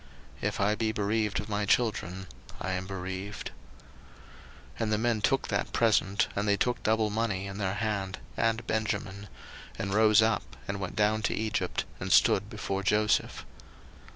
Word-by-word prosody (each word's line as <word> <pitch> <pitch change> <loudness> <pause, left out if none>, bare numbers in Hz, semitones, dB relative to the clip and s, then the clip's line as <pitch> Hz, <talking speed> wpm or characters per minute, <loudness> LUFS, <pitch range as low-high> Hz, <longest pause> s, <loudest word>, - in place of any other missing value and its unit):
If - - -1
I 100 +2 +3
be 110 0 0
bereaved 105 0 0
of - - -5
my 105 -1 -1
children, 95 -5 +1 0.3
I 95 - -3
am 95 0 -3
bereaved. 95 +1 -5 1.3
01:043:015 - - -6
And 110 -1 0
the 105 - +3
men 115 -1 +1
took 135 +6 +1
that - - -1
present, 105 -3 +3
and 100 +1 -1
they 100 0 +3
took 125 +2 0
double 110 -1 +2
money 105 -3 -1
in 100 +1 -6
their 95 -1 -1
hand 105 -3 -2 0.2
and 115 0 0
Benjamin; 105 -2 -2 0.5
and 95 0 -2
rose 110 0 +6
up, 110 0 0
and 100 0 -3
went 95 -2 -4
down 110 0 +2
to - - 0
Egypt, 110 -1 -1
and - - -4
stood - - +5
before 95 0 -3
Joseph. 105 +1 +1
105 Hz, 165 wpm, -29 LUFS, 100-110 Hz, 1.3 s, rose